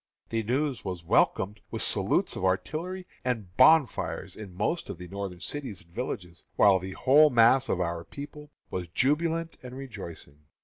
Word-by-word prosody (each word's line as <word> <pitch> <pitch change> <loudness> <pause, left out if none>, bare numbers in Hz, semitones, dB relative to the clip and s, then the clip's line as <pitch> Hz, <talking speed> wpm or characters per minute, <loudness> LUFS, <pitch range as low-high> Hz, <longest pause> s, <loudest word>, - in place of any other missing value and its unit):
The 115 0 0
news 130 +3 -1
was 90 -3 -5
welcomed 95 +4 +2
with - - -3
salutes - - 0
of - - -5
artillery 165 - -1 0.2
and 110 -8 -3
bonfires 140 +1 +4
in 105 -3 -9
most 165 - -2
of 100 - -5
the 90 +1 -9
Northern 95 -2 -6
cities 130 - -5
and 85 - -27
villages, 90 -8 -5
while 100 -2 +6
the 95 +1 -6
whole 145 +7 +6
mass 125 +2 +5
of 90 - 0
our 85 -1 -2
people 145 - -9 0.2
was 90 -1 -3
jubilant 160 - 0
and 125 0 -9
rejoicing. 85 - -9
115 Hz, 165 wpm, -28 LUFS, 90-145 Hz, 0.2 s, while